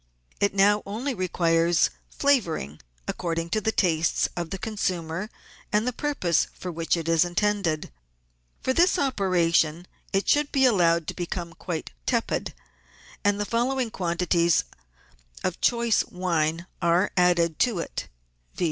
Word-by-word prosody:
It 200 Hz, -1 st, +1 dB
now 205 Hz, +1 st, +4 dB
only 235 Hz, +8 st, -3 dB
requires 170 Hz, -3 st, +2 dB, 0.2 s
flavouring 175 Hz, -, 0 dB, 0.3 s
according 165 Hz, -1 st, -3 dB
to 215 Hz, -, +1 dB
the 220 Hz, +1 st, +1 dB
tastes 165 Hz, -5 st, +1 dB
of 170 Hz, -2 st, -3 dB
the 195 Hz, -, -4 dB
consumer 185 Hz, -3 st, -3 dB, 0.4 s
and 210 Hz, +3 st, +1 dB
the 250 Hz, -, 0 dB
purpose 230 Hz, -, 0 dB
for 180 Hz, -, -6 dB
which 165 Hz, +1 st, 0 dB
it 165 Hz, -1 st, -4 dB
is 165 Hz, 0 st, +4 dB
intended. 175 Hz, -, -1 dB, 0.7 s
For 260 Hz, -, +1 dB
this 350 Hz, +6 st, +4 dB
operation 175 Hz, -, +1 dB, 0.3 s
it 195 Hz, +1 st, 0 dB
should 290 Hz, 0 st, +3 dB
be 265 Hz, -1 st, +3 dB
allowed 170 Hz, -8 st, +3 dB
to -, -, -3 dB
become 175 Hz, -1 st, -5 dB
quite 170 Hz, -2 st, -5 dB, 0.2 s
tepid, -, -, -1 dB, 0.7 s
and 205 Hz, 0 st, +2 dB
the 205 Hz, -, 0 dB
following 240 Hz, +2 st, 0 dB
quan 175 Hz, -4 st, -2 dB
tities 170 Hz, -1 st, +3 dB, 0.8 s
of 185 Hz, -, -2 dB
choice 235 Hz, -2 st, +3 dB
wine 170 Hz, -2 st, -1 dB, 0.2 s
are 170 Hz, +3 st, +2 dB
added 175 Hz, -3 st, +3 dB
to 240 Hz, -6 st, +2 dB
it, 165 Hz, -, -4 dB, 0.5 s
viz. -, -, -11 dB
180 Hz, 140 wpm, -25 LUFS, 170-215 Hz, 0.8 s, now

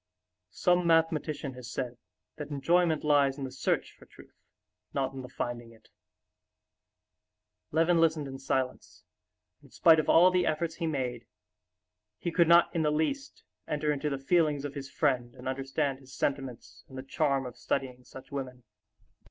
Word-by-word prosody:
Some 180 Hz, -1 st, +2 dB
mathematician 155 Hz, -4 st, +1 dB
has 125 Hz, -1 st, -9 dB
said 120 Hz, -1 st, -4 dB, 0.4 s
that 150 Hz, -1 st, -6 dB
enjoyment 160 Hz, +3 st, +2 dB
lies 145 Hz, -2 st, +3 dB
in 140 Hz, -, -5 dB
the 130 Hz, -, -4 dB
search -, -, -1 dB
for -, -, -18 dB
truth, -, -, -17 dB, 0.6 s
not 135 Hz, -1 st, -1 dB
in 135 Hz, -, -6 dB
the 125 Hz, -, -9 dB
finding 120 Hz, -2 st, -5 dB
it." 110 Hz, -, -22 dB, 1.8 s
Levin 165 Hz, +2 st, +3 dB
listened 155 Hz, -3 st, +2 dB
in 135 Hz, 0 st, -7 dB
silence, 130 Hz, -1 st, -3 dB, 0.6 s
and -, -, -18 dB
in -, -, -26 dB
spite 160 Hz, -1 st, +5 dB
of 155 Hz, -, -1 dB
all 180 Hz, +2 st, +7 dB
the 180 Hz, -1 st, +2 dB
efforts 160 Hz, +1 st, -1 dB
he 170 Hz, -, -2 dB
made, 125 Hz, -6 st, -3 dB, 0.9 s
he 170 Hz, -, -3 dB
could 170 Hz, 0 st, +3 dB
not 170 Hz, +1 st, +6 dB
in 165 Hz, -, +2 dB
the 150 Hz, -, +2 dB
least 160 Hz, -, -2 dB, 0.2 s
enter 150 Hz, 0 st, 0 dB
into 150 Hz, +1 st, -1 dB
the 140 Hz, -, -2 dB
feelings 150 Hz, 0 st, +1 dB
of 145 Hz, -, -5 dB
his 140 Hz, -2 st, -7 dB
friend 125 Hz, -5 st, 0 dB
and -, -, -9 dB
understand 135 Hz, +1 st, -2 dB
his 135 Hz, 0 st, -14 dB
sentiments 135 Hz, -4 st, -3 dB
and 130 Hz, -, -10 dB
the 130 Hz, -, -5 dB
charm 135 Hz, -1 st, 0 dB
of 125 Hz, -, -7 dB
studying 125 Hz, -2 st, -3 dB
such 130 Hz, +1 st, -13 dB
women. 130 Hz, -3 st, -6 dB
140 Hz, 170 wpm, -29 LUFS, 130-160 Hz, 1.8 s, all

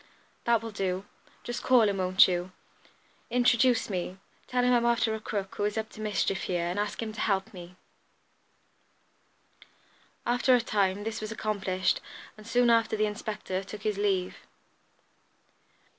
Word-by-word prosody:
"That 235 Hz, -1 st, +3 dB
will 225 Hz, -, -5 dB
do. 190 Hz, -1 st, -2 dB, 0.4 s
Just 240 Hz, -, -4 dB
call 255 Hz, -3 st, +5 dB
him, 200 Hz, -1 st, 0 dB
won't 185 Hz, 0 st, +5 dB
you? 180 Hz, 0 st, -2 dB, 0.8 s
Introduce 245 Hz, 0 st, +3 dB
me. 185 Hz, -1 st, -4 dB, 0.3 s
Tell 250 Hz, 0 st, +1 dB
him 250 Hz, 0 st, +4 dB
I'm 240 Hz, -1 st, +3 dB
after 235 Hz, -1 st, +2 dB
a 220 Hz, -, -3 dB
crook 200 Hz, -2 st, -4 dB
who -, -, -1 dB
is 210 Hz, +1 st, -1 dB
up 220 Hz, 0 st, -2 dB
to 215 Hz, -, -10 dB
mischief 205 Hz, -2 st, -1 dB
here, 175 Hz, -2 st, -1 dB
and 175 Hz, +3 st, -2 dB
ask 210 Hz, +2 st, -2 dB
him 220 Hz, -1 st, -5 dB
to -, -, -9 dB
help 195 Hz, -2 st, 0 dB
me." 180 Hz, -1 st, -10 dB, 2.5 s
After 245 Hz, +1 st, +3 dB
a -, -, +4 dB
time 200 Hz, -3 st, 0 dB
this 225 Hz, 0 st, -4 dB
was 215 Hz, 0 st, -5 dB
accomplished, 190 Hz, -4 st, -1 dB, 0.3 s
and 215 Hz, 0 st, -14 dB
soon 240 Hz, 0 st, +3 dB
after 230 Hz, -1 st, +3 dB
the 215 Hz, -, +2 dB
inspector 210 Hz, -2 st, -4 dB
took 205 Hz, +2 st, -9 dB
his 210 Hz, -2 st, -1 dB
leave. 190 Hz, -3 st, 0 dB
210 Hz, 160 wpm, -28 LUFS, 190-230 Hz, 2.5 s, call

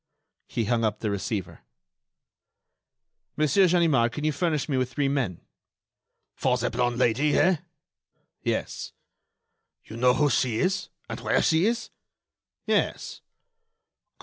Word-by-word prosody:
He 115 Hz, -3 st, -2 dB
hung 115 Hz, +1 st, +1 dB
up 105 Hz, -1 st, 0 dB
the 110 Hz, -, -1 dB
receiver. 100 Hz, -1 st, -4 dB, 1.8 s
"Monsieur 155 Hz, +6 st, +4 dB
Ganimard, 160 Hz, -9 st, +3 dB
can 150 Hz, -, -6 dB
you 155 Hz, -, +2 dB
furnish 155 Hz, -1 st, -1 dB
me 145 Hz, -, -1 dB
with 130 Hz, -1 st, 0 dB
three 140 Hz, +2 st, 0 dB
men?" 135 Hz, -11 st, -1 dB, 0.9 s
"For 125 Hz, -1 st, +1 dB
the 125 Hz, 0 st, -1 dB
blonde 120 Hz, 0 st, 0 dB
Lady, 130 Hz, +5 st, +2 dB
eh?" 185 Hz, -1 st, +4 dB, 0.8 s
"Yes." -, -, -3 dB, 0.9 s
"You 110 Hz, -, -10 dB
know 125 Hz, +1 st, +4 dB
who 145 Hz, 0 st, +2 dB
she 120 Hz, -1 st, +1 dB
is, 185 Hz, -, 0 dB, 0.2 s
and -, -, -6 dB
where -, -, +1 dB
she 165 Hz, +5 st, +3 dB
is?" 235 Hz, +1 st, -2 dB, 0.7 s
"Yes." -, -, -1 dB
130 Hz, 125 wpm, -26 LUFS, 115-155 Hz, 1.8 s, Monsieur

